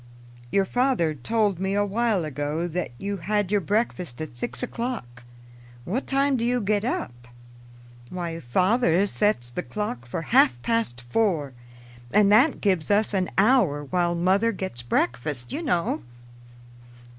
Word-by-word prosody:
"Your 195 +5 +2
father 245 - +1
told 200 - 0
me 190 +1 -1
a 205 0 +2
while 205 -3 0
ago 150 +3 -2
that 175 +1 -3
you 200 +5 -3
had 205 +1 -1
your 205 -1 +2
breakfast 185 - -2
at 155 -6 -6
six 180 - -5
o'clock. 230 - -5 0.6
What 235 +10 -2
time 275 0 +2
do 230 - -2
you 245 +1 +1
get 205 -1 0
up?" 120 - -4 0.8
"Why, 170 -2 -4
father 185 - +2
sets 200 - 0
the 180 - -3
clock 175 - -5
for 160 - -4
half 120 -1 +5
past 230 - -1
four, 150 - 0 0.6
and 205 -1 +4
that 255 +8 +4
gives 185 -7 +1
us 205 +1 +2
an 185 -2 0
hour 195 - +3
while 175 +3 0
mother 190 +6 +2
gets 190 - -5
breakfast, 120 +1 -1
you 315 - -3
know." 210 - 0
190 Hz, 145 wpm, -25 LUFS, 155-220 Hz, 0.8 s, half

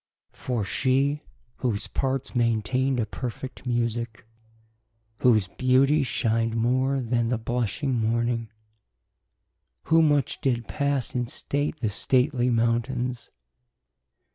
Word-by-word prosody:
For 120 -4 -2
she, 135 +7 +1 0.4
whose 115 -6 -1
parts 135 0 -2
maintainde 120 +3 +1
a 115 - +1
perfect 125 +2 -6
musique, 115 -1 -2 0.9
Whose 110 -6 +4
beautie 135 +6 +3
shin'de 115 -2 0
more 130 +4 +1
then 120 -1 0
the 120 0 0
blushing 120 +3 -1
morning, 115 0 0 1.3
Who 165 +1 +4
much 145 -3 +2
did 120 -4 0
passe 140 -3 -1
in 125 -1 -1
state 145 +5 -3
the 110 - +1
stately 125 +3 +1
mountaines. 120 +1 0
125 Hz, 105 wpm, -26 LUFS, 115-135 Hz, 1.3 s, Whose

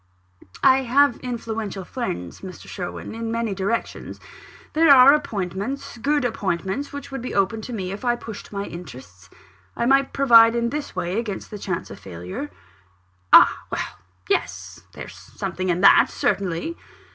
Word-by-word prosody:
"I 260 - +7
have 265 0 +3
influential 225 -6 -5
friends, 90 - -5
Mr. 185 -1 -10
Sherwin, 180 +2 -6
in 225 0 -4
many 230 -2 -1
directions 200 +4 -3 0.5
there 320 0 +4
are 275 0 +9
appointments, 215 -1 -3
good 290 +2 +1
appointments, 195 +3 -2
which 285 -1 -8
would 270 - -5
be 250 - -5
open 200 +3 +1
to 245 - -8
me, 190 -5 -4
if 200 +4 -7
I 240 -1 +2
pushed 225 -3 -9
my 200 -1 -4
interests. 125 - -11 0.5
I 235 - 0
might 275 +2 +3
provide 230 -4 +6
in 235 0 0
this 295 0 -5
way 180 +5 -2
against 210 -4 -5
the 210 - -7
chance 185 -3 -4
of - - -10
failure." 90 +9 -7 0.8
"Ah! - - +8 0.2
well - - -4 0.3
yes. 95 -1 -2
There's - - -9
something 185 0 -5
in 175 +1 0
that, 200 - +7
certainly." 195 - -1
220 Hz, 155 wpm, -23 LUFS, 185-250 Hz, 0.8 s, are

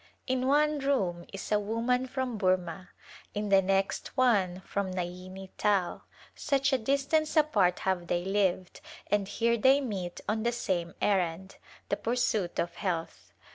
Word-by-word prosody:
In 255 0 0
one 300 +1 +3
room 195 -12 0
is 195 - -7
a 210 - +4
woman 230 +5 0
from 255 -4 -3
Burma, 185 -1 0 0.5
in 210 0 -2
the 195 -1 +6
next 195 +6 -1
one 195 -8 +2
from 200 0 -3
Naini 185 +1 -6
Tal 200 -4 +1 0.2
— - - -23
such 275 -1 +1
a 265 - +3
distance 280 +6 +1
apart 205 -13 +3
have 185 -2 -1
they 175 +1 -1
lived, 190 -2 0 0.3
and 205 -1 +2
here 235 +3 +1
they 265 +5 +5
meet 195 -10 -4
on 220 +1 0
the 235 +2 +1
same 180 -8 -2
errand, 190 -1 0 0.3
the 200 - 0
pursuit 220 -4 0
of 170 0 -1
health. 170 -4 -4
200 Hz, 155 wpm, -29 LUFS, 185-250 Hz, 0.5 s, the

